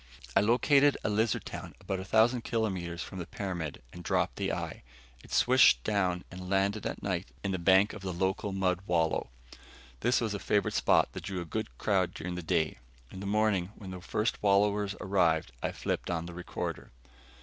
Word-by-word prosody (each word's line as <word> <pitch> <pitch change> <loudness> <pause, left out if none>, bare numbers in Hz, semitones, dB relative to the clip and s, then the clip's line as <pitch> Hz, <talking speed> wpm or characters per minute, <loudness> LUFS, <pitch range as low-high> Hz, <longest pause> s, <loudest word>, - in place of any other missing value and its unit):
I - - +7
located 135 +6 +4
a - - 0
lizard 110 +1 +1
town - - -7
about 95 -1 -3
a - - -4
thousand 115 +5 +3
kilometers 95 -7 -2
from 95 - -8
the 85 - -5
pyramid 90 -9 -5
and 90 - -9
dropped - - 0
the - - -1
eye. - - -4 0.4
It - - -15
swished - - +5
down 90 -4 0
and 90 0 -8
landed 100 +2 +1
at - - -6
night 95 -1 -2 0.2
in 100 - -1
the 95 - -1
bank 95 +3 +4
of 110 - -8
the 95 -1 -3
local 95 +3 -1
mud 95 -2 +1
wallow. 80 -6 +1 0.7
This 120 +2 +2
was 110 -3 -1
a 100 - -3
favorite 105 +1 +1
spot - - +3
that - - -7
drew 95 -2 -3
a 85 - -4
good 110 +7 -4
crowd 95 -4 +1
during 90 +2 -4
the 90 - -4
day. 80 -6 0 0.3
In 95 - -8
the 100 - -5
morning, 105 -2 +1
when 95 -3 -9
the 90 -1 -7
first 105 +5 -1
wallowers 100 0 +2
arrived, 85 -5 +2
I - - -1
flipped - - -3
on 85 -1 -1
the 85 - -8
recorder. 90 +1 -5
95 Hz, 195 wpm, -30 LUFS, 90-105 Hz, 0.7 s, I